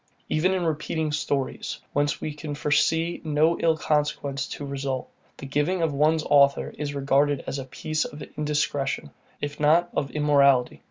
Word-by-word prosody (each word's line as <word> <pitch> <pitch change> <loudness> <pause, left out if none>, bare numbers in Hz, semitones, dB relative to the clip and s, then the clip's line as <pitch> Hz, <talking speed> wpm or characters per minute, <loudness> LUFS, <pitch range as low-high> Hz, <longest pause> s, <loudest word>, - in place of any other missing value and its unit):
Even 170 +5 +2
in 180 -2 -1
repeating 155 0 -1
stories, 140 -3 -2 0.2
whence 145 0 +1
we 155 - -4
can 150 0 -6
foresee 160 +3 +1
no 155 +2 +2
ill 165 -1 +2
consequences 150 -2 -1
to 145 - -6
result, 135 -2 -4 0.3
the - - -8
giving 150 +6 0
of 160 -3 +1
one's 155 +2 +2
author 140 -1 +3
is 145 -1 -4
regarded 140 0 +2
as 140 - -3
a 135 - -5
piece 155 +4 -2
of 145 0 -7
indiscretion, 145 - -1 0.3
if 145 0 -4
not 165 +4 +3
of 135 - -1
immorality. 140 -4 +3
150 Hz, 160 wpm, -25 LUFS, 140-155 Hz, 0.3 s, author